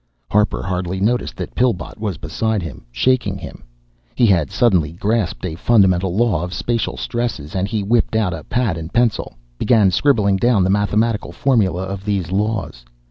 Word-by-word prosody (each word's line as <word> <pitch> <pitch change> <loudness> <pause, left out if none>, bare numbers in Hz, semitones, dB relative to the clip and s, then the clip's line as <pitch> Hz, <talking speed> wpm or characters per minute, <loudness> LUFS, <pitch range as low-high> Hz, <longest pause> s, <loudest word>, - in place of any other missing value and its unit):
Harper 105 +1 +2
hardly 90 0 -2
noticed 120 +5 0
that - - -6
Pillbot 115 -7 -1
was 105 -5 -3
beside 105 +5 -2
him, 80 -6 -8
shaking 125 - +1
him. - - -10 0.5
He 125 - +4
had 85 - +3
suddenly 90 -10 +2
grasped 105 +1 -1
a 85 - -3
fundamental 95 -2 +2
law 105 -7 +2
of 90 +1 -5
spacial 115 -2 -2
stresses, 115 - -3
and 95 0 -1
he 105 -1 -2
whipped 110 +1 +1
out 105 -5 +1
a 80 - -6
pad 115 -10 -1
and 80 +2 -7
pencil, 120 - 0 0.2
began 105 -4 +4
scribbling 100 -3 +2
down 115 -2 +3
the 95 - +2
mathematical 105 +2 0
formula 100 -10 +1
of 95 0 -5
these 100 -4 -2
laws. 100 - -2
100 Hz, 170 wpm, -19 LUFS, 90-115 Hz, 0.5 s, He